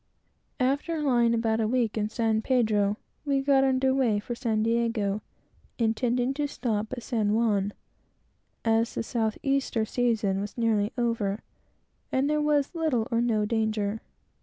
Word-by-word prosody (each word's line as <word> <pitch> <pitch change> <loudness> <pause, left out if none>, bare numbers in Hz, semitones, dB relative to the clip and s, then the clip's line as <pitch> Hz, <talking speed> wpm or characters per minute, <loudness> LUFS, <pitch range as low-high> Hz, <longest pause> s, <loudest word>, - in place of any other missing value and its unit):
We 255 - +3 0.2
lay 270 -8 +2
about 225 -1 +1
a 220 - +1
week 235 -2 0
in 215 -1 -1
San 225 -1 0
Pedro, 215 -5 +1 0.3
and 275 -2 0
got 275 -1 +4
under 265 0 +2
weigh 250 -6 +2
for 240 - -5
San 225 -3 -1
Diego, 225 -3 0 0.6
intending 245 +2 +1
to 290 +1 -1
stop 220 -6 -2
at 245 -2 -6
San 215 -4 0
Juan, 205 -3 +1 0.9
as 225 0 +2
the - - -1
south 225 -2 -1
easter 275 -5 0
season 220 -5 0
was 205 +3 -6
nearly 220 -3 +1
over, 225 -4 -1 0.7
and 265 +2 +1
there 300 0 +1
was 295 0 +1
little 305 -9 0
or 230 0 +2
no 220 -3 +1
danger. 220 -1 -1
230 Hz, 150 wpm, -27 LUFS, 215-260 Hz, 0.9 s, got